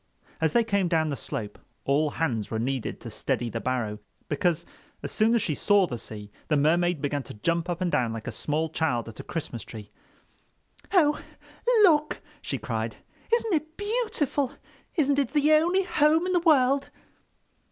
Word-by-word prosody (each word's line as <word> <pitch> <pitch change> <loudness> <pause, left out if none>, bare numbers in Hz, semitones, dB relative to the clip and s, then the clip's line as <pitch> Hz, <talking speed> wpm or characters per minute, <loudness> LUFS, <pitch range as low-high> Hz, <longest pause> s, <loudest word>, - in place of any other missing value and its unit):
As 160 -1 +2
they 235 - +4
came 200 -4 +1
down 160 -2 +1
the 140 - -1
slope 105 -4 -6 0.3
all 145 +3 +2
hands 120 -10 -1
were 110 - -2
needed 125 +1 -2
to 115 - -7
steady 120 0 -2
the 115 - -3
barrow, 120 -5 -2 0.3
because 170 +2 0 0.4
as - - -4
soon 225 +2 +3
as 225 - +2
she 155 - 0
saw 205 +5 +4
the 120 -8 -5
sea 105 -2 -8 0.2
the 150 - +2
Mermaid 170 +2 +2
began 145 0 0
to 130 - -10
jump 170 +10 -1
up 175 +1 -3
and 180 -2 0
down 120 -3 +1
like 115 -1 -6
a - - -3
small 155 +2 -1
child 150 -8 -1
at 110 - -12
a - - -6
Christmas 140 -8 -5
tree. 105 -2 -10 1.0
"Oh, 300 -6 +4 0.6
look!" 305 -5 +4 0.2
she - - -3
cried, - - -3 0.4
"isn't 460 -3 +2
it 315 +1 -2
beautiful? 410 - -1 0.4
Isn't 285 -4 +2
it 275 -2 -1
the 300 0 +3
only 345 +5 +4
home 320 -1 +3
in 370 - 0
the 355 - +4
world?" 275 -4 +3
170 Hz, 180 wpm, -27 LUFS, -, 1.0 s, they